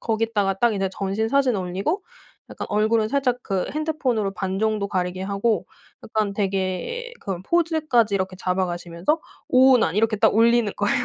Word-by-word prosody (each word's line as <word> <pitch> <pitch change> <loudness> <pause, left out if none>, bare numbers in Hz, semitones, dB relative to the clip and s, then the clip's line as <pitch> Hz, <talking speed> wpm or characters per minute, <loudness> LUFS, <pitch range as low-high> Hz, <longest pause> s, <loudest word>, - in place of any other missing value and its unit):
거기다가 220 -3 0
딱 230 +3 +2
이제 195 -1 0
전신 200 +3 -2
사진 265 -4 +2
올리고 195 - -2 0.5
약간 - - -6
얼굴은 215 +1 +2
살짝 255 -1 +1
그 195 -3 -1
핸드폰으로 270 -9 -1
반 190 -1 -3
정도 215 -1 0
가리게 185 -1 -2
하고 200 +3 0 0.4
약간 215 -2 -1
되게 195 - -2
그런 185 -2 -5
포즈까지 310 - +2
이렇게 190 -1 -2
잡아가시면서 180 - -1 0.3
오운완 255 -8 +5
이렇게 220 0 +2
딱 210 - +3
올리는 230 -1 +4
거예요. 210 +4 +1
215 Hz, 365 characters per minute, -23 LUFS, 190-245 Hz, 0.5 s, 오운완